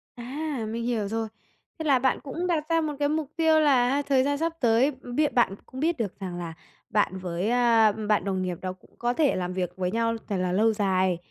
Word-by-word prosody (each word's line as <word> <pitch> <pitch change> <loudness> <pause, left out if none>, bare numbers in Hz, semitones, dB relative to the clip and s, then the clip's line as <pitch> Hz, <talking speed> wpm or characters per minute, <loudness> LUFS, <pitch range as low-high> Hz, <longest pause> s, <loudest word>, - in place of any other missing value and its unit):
À, 265 +1 -4
mình 230 +1 -3
hiểu 230 -4 -1
rồi. 225 +2 -2 0.5
Thế - - -3
là 275 -4 +4
bạn 260 +1 +1
cũng 325 +6 -3
đặt 330 -4 +1
ra 330 0 +3
một 305 -1 -2
cái 290 0 +2
mục 305 -1 -2
tiêu 320 -1 +4
là 265 -5 +4
ha, 280 +2 +1
thời 275 -2 +2
gian 285 +1 0
sắp 330 +1 -1
tới 240 +3 +4
biết 265 +2 -2
bạn 235 -6 +3
cũng 260 - -9
biết 330 +3 +1
được 210 -6 -4
rằng 180 -3 -5
là 170 -2 -5 0.4
bạn 205 -2 +1
với, 180 +2 -2
à, 230 -3 +4
bạn 210 0 0
đồng 190 -2 -1
nghiệp 180 -2 -2
đó 185 -1 -3
cũng 185 - -24
có 240 0 0
thể 290 +1 +2
làm 180 0 -2
việc 180 -2 -1
với 180 -1 -1
nhau 230 +1 0
thật 200 - 0
là 180 0 0
lâu 220 +4 +3
dài, 190 -3 +1
235 Hz, 240 wpm, -26 LUFS, 195-285 Hz, 0.5 s, là